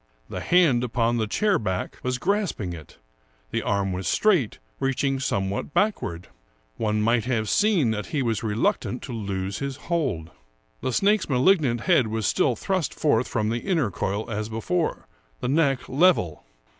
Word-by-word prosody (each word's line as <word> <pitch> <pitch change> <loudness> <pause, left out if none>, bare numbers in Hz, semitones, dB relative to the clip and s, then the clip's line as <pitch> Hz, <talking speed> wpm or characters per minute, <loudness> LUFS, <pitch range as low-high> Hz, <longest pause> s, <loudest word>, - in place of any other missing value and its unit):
The - - -4
hand 160 -9 +3
upon 120 0 +1
the 110 -2 0
chair 205 - +2
back 95 -4 -3
was 125 0 -1
grasping 180 - -1
it; 80 -3 -11 0.5
the - - 0
arm 100 -2 0
was 90 +1 -3
straight, 180 - +2 0.2
reaching 135 0 0
somewhat 100 0 -2
back 210 0 +2
ward. 85 +1 -6 0.5
One 105 -1 0
might 115 0 +2
have 115 -4 0
seen 190 - +3
that 105 -1 -3
he 150 -5 -1
was 115 -3 0
reluctant 115 +2 -1
to 130 - -6
lose 100 -3 -3
his 140 -1 -3
hold. 135 - -2 0.5
The 130 - -1
snake's 200 - +2
malignant 130 -2 +3
head 165 -11 +3
was 110 -1 -2
still 125 - +2
thrust 185 - -2
forth 145 -4 +2
from 110 -2 -1
the 115 +1 -1
inner 160 - 0
coil 100 +4 -2
as 110 -1 -3
before, 160 +10 -2 0.3
the - - -3
neck 135 -2 +1
level. 135 - +2
120 Hz, 165 wpm, -25 LUFS, 105-155 Hz, 0.5 s, hand